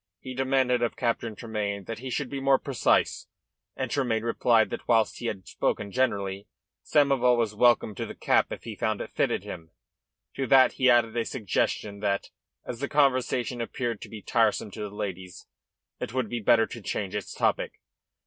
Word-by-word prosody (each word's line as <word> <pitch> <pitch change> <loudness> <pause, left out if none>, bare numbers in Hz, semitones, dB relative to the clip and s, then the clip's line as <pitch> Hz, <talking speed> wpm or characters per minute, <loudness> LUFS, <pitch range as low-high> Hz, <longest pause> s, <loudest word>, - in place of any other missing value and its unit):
He 130 - -7
demanded 130 -1 +1
of 120 - 0
Captain 115 -2 -1
Tremayne 105 -3 -3
that 110 +3 -6
he 130 +1 -6
should 140 +2 -2
be 140 - -3
more 135 0 +4
precise, 140 -3 +1 0.5
and 130 -2 -3
Tremayne 120 -5 0
replied 115 -1 +3
that, - - -6
whilst 115 -2 +2
he 120 - -3
had 95 -4 -5
spoken 100 -1 -2
generally, 100 -6 -1 0.4
Samoval 135 -4 +3
was 115 -3 0
welcome 120 -1 +3
to - - -5
the - - -8
cap - - +2
if - - -6
he - - -6
found - - -1
it - - -7
fitted - - 0
him. 80 -2 -8 0.7
To 135 - -1
that 130 +1 +6
he 130 -1 +2
added 120 -2 +4
a 115 - +1
suggestion 105 -3 -2
that, 100 -1 -1 0.3
as 120 - -6
the 140 - -3
conversation 130 -3 +1
appeared 115 -2 -3
to - - -9
be 110 -3 -9
tiresome 110 -3 +1
to 105 - -8
the 105 - -4
ladies, 95 -3 -6 0.5
it 120 - -5
would 125 -5 0
be 120 - -2
better 115 +1 +4
to 115 - -9
change 100 0 -3
its 105 -2 -4
topic. - - 0
115 Hz, 185 wpm, -27 LUFS, 105-130 Hz, 0.7 s, that